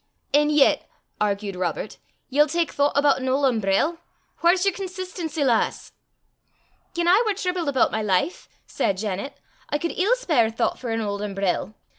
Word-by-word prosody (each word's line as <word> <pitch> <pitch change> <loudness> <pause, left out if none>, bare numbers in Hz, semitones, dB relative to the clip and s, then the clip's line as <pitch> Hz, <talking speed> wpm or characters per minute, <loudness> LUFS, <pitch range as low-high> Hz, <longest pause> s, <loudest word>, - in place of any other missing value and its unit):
"An' 295 +1 +4
yet," 300 -2 +3 0.3
argued 200 -1 -1
Robert, 180 +3 -3 0.3
"ye'll 295 +3 +3
tak 335 +1 0
thoucht 285 0 +1
aboot 285 -1 +4
an 260 0 -2
auld 275 +2 +2
umbrell? 235 - +1 0.4
Whaur's 355 +2 +4
yer 395 - +4
consistency, 365 -5 -4
lass?" 240 -5 0 1.0
"Gien 340 0 0
I 375 +5 +6
war 425 -3 0
tribled 360 -5 -2
aboot 265 -3 +2
my 220 - -1
life," 200 - -1 0.2
said 195 - -1
Janet, 205 +5 -4 0.3
"I 295 - 0
cud 335 +3 -3
ill 410 +8 +3
spare 310 - +2
thoucht 225 - -1
for 245 - -5
an 225 0 -1
auld 205 -1 -3
umbrell. 200 0 -2
285 Hz, 165 wpm, -24 LUFS, 210-345 Hz, 1.0 s, I